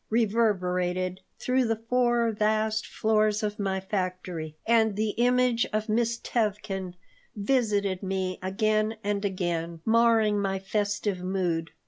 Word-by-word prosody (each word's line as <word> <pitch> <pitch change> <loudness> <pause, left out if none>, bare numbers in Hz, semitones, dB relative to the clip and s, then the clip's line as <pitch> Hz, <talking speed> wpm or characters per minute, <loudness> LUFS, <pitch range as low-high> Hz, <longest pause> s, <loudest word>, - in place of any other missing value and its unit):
reverberated 185 -5 0 0.2
through 255 +1 +1
the 225 -2 +1
four 235 0 +1
vast 215 +1 0
floors 215 -1 +1
of 210 0 -2
my 190 -1 -1
factory, 185 -5 -4
and 220 -2 +3
the 215 0 0
image 245 +1 +2
of 215 +1 -1
Miss 235 +1 +1
Tevkin 205 -6 -2 0.4
visited 205 -4 0
me 190 -1 -2
again 215 +3 0
and 205 0 -1
again, 170 -4 -2
marring 225 -2 +3
my 195 -1 -1
festive 205 -1 -2
mood. 175 -3 -1
210 Hz, 120 wpm, -27 LUFS, 190-225 Hz, 0.4 s, and